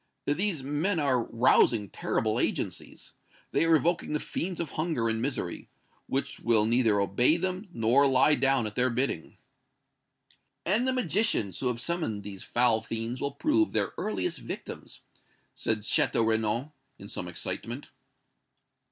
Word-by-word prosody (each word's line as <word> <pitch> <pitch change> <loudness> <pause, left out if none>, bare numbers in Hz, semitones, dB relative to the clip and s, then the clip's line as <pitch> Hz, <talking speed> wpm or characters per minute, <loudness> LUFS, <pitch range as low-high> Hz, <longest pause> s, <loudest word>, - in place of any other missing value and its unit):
These 165 0 0
men 155 +7 0
are 130 -5 +2
rousing 115 -2 +3
terrible - - -1
agencies. - - -3 0.4
They - - +2
are 165 0 +5
evoking 165 +1 +1
the 150 - +1
fiends 180 +3 -4
of 165 -4 -3
hunger 155 -8 -1
and 115 0 -1
misery, 125 -9 -3 0.4
which 135 - -2
will 110 -2 +3
neither 115 -3 +3
obey 100 - +3
them 185 +3 -3
nor 125 +1 +4
lie 135 +3 +4
down 135 -4 +2
at 105 - -4
their 125 +3 +2
bidding." 120 -9 -2 1.3
"And 215 +8 +2
the - - +3
magicians 210 - 0
who 130 - -1
have 120 -2 -1
summoned 125 -9 -2
these 100 -1 -8
foul 120 -2 +2
fiends 115 +2 -4
will 140 0 -1
prove 315 - +1
their - - 0
earliest 100 -4 -2
victims!" - - -8 0.5
said 110 -1 -1
Château 110 +1 +2
Renaud, 110 +6 0 0.2
in - - -10
some - - -5
excitement. - - -5
130 Hz, 145 wpm, -28 LUFS, 110-165 Hz, 1.3 s, are